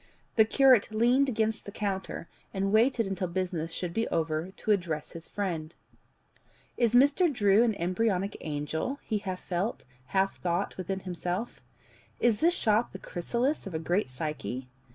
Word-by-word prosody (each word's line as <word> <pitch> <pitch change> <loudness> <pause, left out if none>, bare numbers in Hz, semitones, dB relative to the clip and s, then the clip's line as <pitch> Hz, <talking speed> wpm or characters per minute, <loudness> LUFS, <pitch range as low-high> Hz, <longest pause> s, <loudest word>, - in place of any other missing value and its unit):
The 220 - +6
curate 255 -1 +5
leaned 245 +5 +3
against 220 -2 -1
the 200 - -7
counter, 195 -4 -3 0.3
and 195 +1 0
waited 230 +2 +3
until 190 -1 -2
business 175 -2 -2
should 175 0 -4
be 225 +3 0
over 160 +1 -1
to 205 +3 -1
address 170 -7 -1
his 165 0 -8
friend. 170 -6 -3 1.0
"Is 235 -1 +2
Mr. 285 +7 +5
Drew 205 -4 +4
an 230 -3 +3
embryonic 190 +2 0
angel?" 155 - -3
he 215 -2 -1
half 185 -2 -5
felt, 185 +6 -2 0.2
half 195 +4 0
thought 175 +2 -1
within 190 +1 -3
himself. 180 +4 -4 0.6
"Is 230 -3 +3
this 345 +2 +4
shop 220 +2 +2
the - - -5
chrysalis 240 - -2
of 180 - -6
a - - +2
great 175 +2 0
psyche? 130 -3 -4
195 Hz, 155 wpm, -29 LUFS, 170-225 Hz, 1.0 s, The